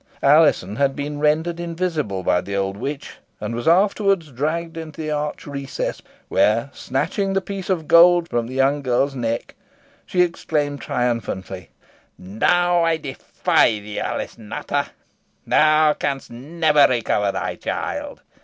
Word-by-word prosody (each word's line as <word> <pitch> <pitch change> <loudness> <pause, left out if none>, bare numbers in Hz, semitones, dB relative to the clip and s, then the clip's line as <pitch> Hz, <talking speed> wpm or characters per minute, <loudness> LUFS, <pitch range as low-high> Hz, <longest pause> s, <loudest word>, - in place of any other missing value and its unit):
Alizon 140 - +4
had 140 -1 +1
been 145 0 -4
rendered 160 +3 +1
invisible 165 - -2
by 90 0 +2
the 100 - -5
old 95 0 -1
witch, 140 +7 -6 0.2
and - - -4
was 120 +3 -4
afterwards 195 -2 +2
dragged 165 +6 -2
into 160 -1 -8
the 155 -1 -3
arched 150 0 -3
recess 140 -1 -4
by - - -31
her, - - -27
where, 115 +5 +2
snatching 195 +9 -2
the 195 - +2
piece 195 -1 -7
of 165 -5 -1
gold 175 0 +6
from 120 -5 -1
the 130 - -7
young 135 +2 +2
girl's 135 +1 +1
neck, 115 -3 -3 0.5
she 180 -1 +3
exclaimed 150 -5 -2
triumphantly 100 -6 -3 0.5
"Now 175 - +2
I 165 -1 +2
defy 135 -5 +1
thee, 105 0 -6
Alice - - -4
Nutter. 140 +6 -3 0.6
Thou 155 0 +4
canst 140 -2 -3
never 150 +3 +3
recover 110 -5 +1
thy - - -3
child. - - -5
145 Hz, 145 wpm, -21 LUFS, 120-165 Hz, 0.6 s, gold